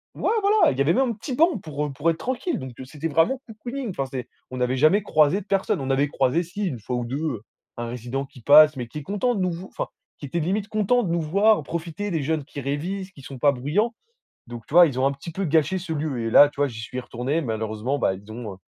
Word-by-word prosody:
ouais - - 0
voilà, 410 +1 +4
il 130 - -5
y - - +1
avait 150 +5 +3
même 265 0 +2
un - - -2
petit 245 +5 -5
banc 330 +6 +3
pour, 150 -3 -4
heu, - - -6
pour 150 +4 +1
être 165 - -4
tranquille, 260 +7 -2
donc 130 -1 -7
heu, - - -6
c'était 150 +4 -5
vraiment 165 - +2
cocooning. 240 +3 -6
Enfin 135 -6 -2
c'est 130 -3 -5 0.2
on 130 - -5
n'avait 125 +1 0
jamais 155 +9 +4
croisé 155 -1 +3
de - - -14
personnes. 195 -5 +1
On 135 - -3
avait 140 +2 +2
croisé 135 +3 +1
si, 190 +5 -4
1 130 -9 -4
fois 125 +4 -4
ou 120 - -2
2, 130 +4 -3
heu, 150 -9 -2 0.4
un 120 0 -3
résident 125 +3 -4
qui 130 -2 -16
passe, 150 +4 +7
mais 125 -2 -4
qui 120 - -9
est - - -9
content 205 - 0
de 200 - -1
nous 185 -1 +1
v 175 +3 -7
enfin - - -4 0.3
qui - - -7
était 170 +6 -2
limite 195 +6 -1
content 215 +3 +2
de 175 - -2
nous 170 0 +1
voir 200 +6 +3
profiter. 170 +6 -4
Des 160 -4 -1
jeunes 155 +1 -1
qui 145 - -8
révisent, 180 +8 -3
qui 145 - -15
sont 135 0 -9
pas 145 +1 +5
bruyants 155 - 0 0.6
donc 120 -2 -9
tu - - -9
vois? 175 0 +9
Ils 130 -4 -2
ont 135 - +3
un 140 - +2
petit 140 +4 -9
peu 195 +4 -2
gâché 160 +2 +2
ce 175 -2 -5
lieu 145 -5 -2
et - - -1
là 145 +5 +8
tu - - -25
vois? 145 0 +2
J'y 115 -3 -8
suis 125 +2 -5
retourné. 125 +5 -2
Malheureusement 110 +2 -2
bah, 95 - +2
ils 100 +3 -13
ont, 115 -2 -6
heu, - - -15
150 Hz, 280 wpm, -24 LUFS, 130-190 Hz, 0.6 s, vois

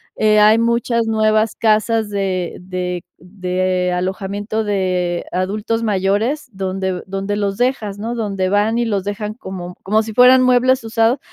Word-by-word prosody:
eh, 215 0 +3
hay 215 +1 +6
muchas 235 0 +1
nuevas 215 0 +2
casas 220 0 +1
de 190 -3 -2
de 180 -1 -4 0.2
de 185 -1 -1
alojamiento 200 +4 -2
de 185 -4 -1
adultos 210 +5 -2
mayores, 215 +8 0
donde 190 -2 -3
donde 195 +1 -3
los 200 -1 -2
dejas, 225 -5 -1
¿no?, 230 +3 -3
donde 195 -5 -1
van 210 +3 +1
y 240 - +1
los 200 -4 -1
dejan 210 +1 -4
como 180 -6 -8
como 215 +3 +2
si 220 0 -7
fueran 250 +3 +7
muebles 255 0 +3
usados, 225 +3 +1
205 Hz, 150 wpm, -18 LUFS, 190-225 Hz, 0.2 s, fueran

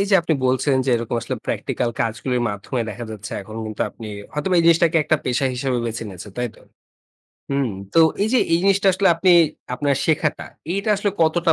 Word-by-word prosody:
এই 200 - +1
যে, - - +5
আপনি 165 - +1
বলছিলেন, 130 +1 +2
যে, - - +2
এরকম 115 +1 -3
আসলে - - -3
প্র্যাকটিক্যাল 120 -2 -1
কাজগুলির 120 +2 -1
মাধ্যমে 105 +5 -4
দেখা 115 +4 -6
যাচ্ছে 105 -1 -7
এখন 110 +3 -10
কিন্তু 110 -1 -3
আপনি 110 - -10 0.3
হয়তোবা 150 +5 -1
এই - - +4
জিনিসটাকে 170 0 +4
একটা 155 - +2
পেশা 130 +2 +1
হিসাবে 125 -1 -1
বেছে 115 +1 -4
নিয়েছেন, 95 +2 -10
তাই 125 - 0
তো? - - -19 0.9
হুম। 140 -4 0 0.2
তো - - +5 0.2
এই 215 - +1
যে, 255 - +5
এই 165 - +5
জিনিসটা 195 0 +3
আসলে 190 +1 +2
আপনি 180 +3 +2 0.4
আপনার 140 +1 +1
শেখাটা, 155 -1 0 0.3
এইটা 200 +2 -2
আসলে 205 0 0
কতটা 165 +1 +3
135 Hz, 200 wpm, -21 LUFS, 120-170 Hz, 0.9 s, যে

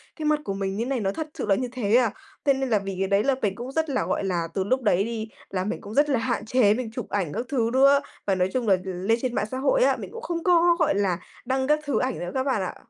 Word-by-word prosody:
"Cái 310 - -5
mặt 300 0 +3
của 195 - -2
mình 195 0 -3
như 230 - -1
này, 265 0 -1
nó 195 -3 0
thật 310 +8 -5
sự - - -4
là 200 -2 +3
như 250 +5 -2
thế 235 -4 +1
à?" 245 -3 +4 0.3
Thế 280 - +5
nên 265 -1 -2
là 215 -3 +3
vì 195 -1 -5
cái 195 - +1
đấy 200 +1 +2
là 275 -1 +2
mình 195 -2 0
cũng 245 +4 -6
rất 320 +2 -1
là, 260 - 0
gọi - - -1
là, 175 -3 -1
từ 190 - 0
lúc 255 +7 0
đấy 200 -5 +3
đi, 220 0 -4 0.2
là 185 -1 -2
mình 215 - -3
cũng 205 - -9
rất 290 +4 +3
là 265 -4 +2
hạn 235 -2 -2
chế 220 -3 +4
mình 235 0 -3
chụp - - -6
ảnh 180 -8 -1
các 240 - -3
thứ 235 -5 +1
nữa, 275 +2 +6 0.3
và 195 - +3
nói 185 0 +1
chung 250 -3 -1
là 195 - +6
l - - -11
lên 190 +5 0
trên 250 -2 -2
mạng - - +1
xã 260 - -3
hội - - +3
á, - - +3
mình - - -7
cũng 465 - -8
không 340 -6 -3
có, 345 -1 +5
gọi - - +2
là, 195 -3 +1 0.3
đăng 260 +1 0
các 300 +1 +3
thứ 290 -2 0
ảnh 255 -1 -1
nữa 175 0 -4
các 260 - +1
bạn 260 -7 0
ạ. 185 - -4
235 Hz, 315 wpm, -25 LUFS, 200-270 Hz, 0.3 s, nữa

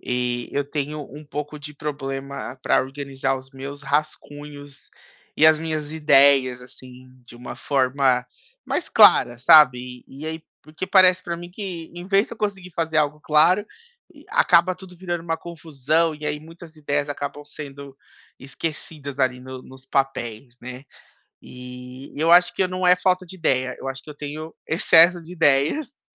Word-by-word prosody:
E 125 -1 -2
eu 145 0 0
tenho 150 0 -3
um 150 - -10
pouco 150 +1 -6
de 150 +1 -8
problema 140 -3 -5
para - - +3
organizar 135 0 -3
os 130 0 -13
meus 140 +1 -8
rascunhos 145 -1 -5 0.5
e 155 - +6
as 155 -1 +6
minhas 155 -2 -4
ideias, 135 -4 +4
assim, 130 0 -12 0.2
de 120 - -13
uma 125 - -8
forma 130 -2 +1 0.4
mais - - -2
clara, 120 0 +6
sabe, 125 -4 +5
e 135 +2 -12
e - - -4
aí, 160 0 -5 0.2
porque 155 +4 -7
parece 185 -1 +5
para 170 -1 -4
mim 175 +1 -9
que, 180 -5 -7
em 175 +1 -8
vez 200 +2 +3
de - - -10
eu - - -24
conseguir 195 -4 -3
fazer 160 -1 -2
algo 150 0 0
claro, 160 +7 +3 0.5
e - - -18
acaba 180 +2 +4
tudo 180 -1 -14
virando 175 -1 -4
uma 165 -1 -2
confusão, 160 -1 -1
e 150 0 -7
aí 150 0 -2
muitas 165 +1 -14
ideias 145 -1 -2
acabam 145 0 -5
sendo 140 -2 -10 0.4
esquecidas, 140 0 -6
ali, 130 -2 +1
no 130 0 -9
nos 130 0 -14
papéis, 125 -3 -2
né. 125 +2 -9 0.6
E 125 +1 -11
eu 160 +3 +1
acho 180 +1 +6
que - - +1
eu 185 - 0
não 185 0 -2
é 180 0 +6
falta 185 0 0
de 190 - -10
ideia, 130 -6 0
eu - - -8
acho 135 0 -6
que - - -12
eu - - -9
tenho 155 +2 -7
excesso 170 +2 +5
de 165 +2 -12
ideias, 165 - +1
145 Hz, 170 wpm, -23 LUFS, 135-165 Hz, 0.6 s, e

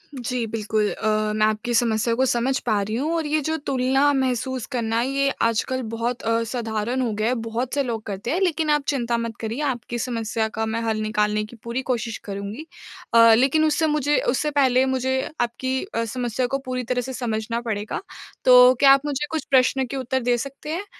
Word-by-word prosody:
जी, 245 -1 -2
बिल्कुल 215 -1 -1
अ, 215 0 0
मैं 215 0 +3
आपकी 215 +3 -1
समस्या 230 0 +2
को 260 - +2
समझ 260 +1 +1
पा 215 -3 +1
रही 215 +3 -3
हूँ 300 +7 -1
और 325 - -1
ये 305 +1 +1
जो 320 - 0
तुलना 270 0 +2
महसूस 260 -2 -1
करना, 230 -2 0
ये 275 +2 +1
आजकल 230 +3 0
बहुत 235 +1 -2
अ, 230 0 +1
साधारण 230 +1 -2
हो 240 - 0
गया 215 +1 -1
है, 245 - +2
बहुत 240 +3 -3
से 285 - +1
लोग 230 -4 -4
करते 200 +4 -4
हैं। 345 - +1
लेकिन 325 -4 +1
आप 295 -1 +2
चिंता 240 -4 0
मत 230 -2 -4
करिए, 225 +5 -4
आपकी 245 -4 -2
समस्या 225 -2 -2
का 220 - 0
मैं 225 +1 -2
हल 225 -1 -1
निकालने 210 0 0
की 225 - -13
पूरी 235 +3 -3
कोशिश 230 -2 -1
करुँगी। 200 +8 -6 0.5
अ, 230 -1 +8
लेकिन 275 +5 +3
उससे 315 +1 +2
मुझे 295 -1 +1
उससे 300 +4 0
पहले 265 -2 +3
मुझे 260 0 0 0.2
आपकी 260 +2 -1
अ, 380 - -3
समस्या 245 +1 -2
को 275 +2 -1
पूरी 255 0 -3
तरह 250 +1 -1
से 260 +2 -6
समझना 230 -2 -2
पड़ेगा। 215 -3 -3 0.4
तो 250 0 +8
क्या 275 -1 +7
आप 275 +1 +1
मुझे 295 0 -1
कुछ 315 -3 -2
प्रश्न 260 0 +3
के 275 - -5
उत्तर 260 0 -1
दे 245 0 +2
सकते 275 +4 -7
हैं? 385 +4 -4
245 Hz, 205 wpm, -23 LUFS, 225-265 Hz, 0.5 s, अ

